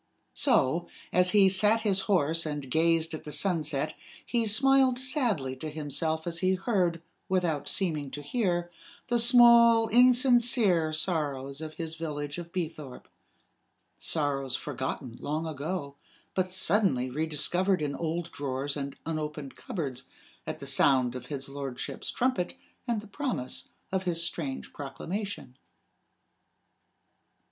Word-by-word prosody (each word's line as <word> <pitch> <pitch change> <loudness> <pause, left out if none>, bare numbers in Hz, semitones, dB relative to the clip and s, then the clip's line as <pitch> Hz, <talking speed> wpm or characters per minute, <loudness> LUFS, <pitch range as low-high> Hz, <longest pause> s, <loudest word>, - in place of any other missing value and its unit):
So, 160 +7 +2 0.3
as 180 +1 +4
he 195 0 +5
sat 210 +4 +3
his 200 -3 +2
horse 165 -3 +3
and 145 -4 -5
gazed 165 +1 +2
at 155 - -6
the 150 - -8
sunset, 155 -5 0 0.3
he 235 -2 0
smiled 265 +3 +4
sadly 245 - 0
to 155 +4 -5
himself 155 +1 -2
as 170 -1 -1
he 185 +1 +2
heard, 180 -5 0 0.3
without 165 -6 0
seeming 155 -7 -1
to 145 +2 -7
hear, 175 - -1 0.4
the 240 -1 +2
small, 235 -1 +7
insincere 240 -8 +4
sorrows 145 -4 -2
of 155 -1 -7
his 165 -1 -5
village 150 -1 -5
of 170 0 -9
Beethorpe 155 -7 -6 0.9
sorrows 140 -4 0
forgotten 130 -2 -5
long 155 +3 -3
ago, 145 -1 -5 0.4
but 185 -1 -1
suddenly 185 - +2
rediscovered 160 +6 +1
in 145 -1 -2
old 170 +2 -3
drawers 140 0 -3
and 140 -1 -5
unopened 150 -3 -4
cupboards, 135 -7 -5 0.4
at - - -4
the - - -8
sound 130 -3 +3
of 125 - -8
his 135 -2 -4
lordship's 135 -2 -5
trumpet 250 -8 -1 0.3
and 230 -3 0
the 215 - -13
promise 210 - -3 0.2
of 190 0 -1
his 170 -2 +3
strange 160 -6 -3
proclamation. 145 - -6
165 Hz, 130 wpm, -28 LUFS, 145-195 Hz, 0.9 s, small